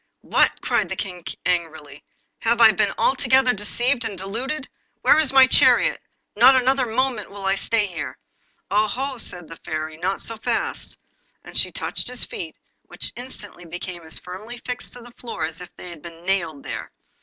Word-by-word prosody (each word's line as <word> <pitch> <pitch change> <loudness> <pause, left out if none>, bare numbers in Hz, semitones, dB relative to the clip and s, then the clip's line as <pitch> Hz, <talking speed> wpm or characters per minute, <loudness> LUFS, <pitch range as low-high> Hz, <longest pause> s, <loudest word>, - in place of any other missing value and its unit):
'What!' - - +2
cried - - +1
the - - -3
King 180 -4 -5 0.2
angrily, 160 -5 -2 0.4
'have 235 +1 +1
I 225 -2 +9
been 200 0 +1
altogether 260 -1 +3
deceived 240 +5 0
and 200 -4 -4
deluded? 250 - -4 0.4
Where - - +6
is 310 -4 +3
my 265 -1 +8
chariot? 255 - +6 0.3
Not 260 +5 +7
another 260 0 +2
moment 245 -1 -1
will 200 0 -8
I 195 - +3
stay 220 +2 +1
here.' 185 -3 -6 0.5
'Oho,' 240 +6 0
said 175 -5 -4
the 165 - -10
Fairy, 155 0 -4
'not 190 +4 -1
so 225 - -5
fast.' - - -2 0.5
And - - -13
she - - +3
touched - - -2
his - - -2
feet, 380 -9 -6 0.3
which - - -3
instantly 225 -7 -7
became 175 +1 -6
as 160 -1 -3
firmly 210 +7 -8
fixed 250 0 -4
to 245 - -9
the 240 0 -14
floor 230 -10 -4
as 160 +2 -7
if 180 - -9
they 180 - -8
had 165 -3 -11
been 170 +1 -12
nailed 170 -7 -1
there. - - -6
210 Hz, 180 wpm, -23 LUFS, 175-250 Hz, 0.5 s, I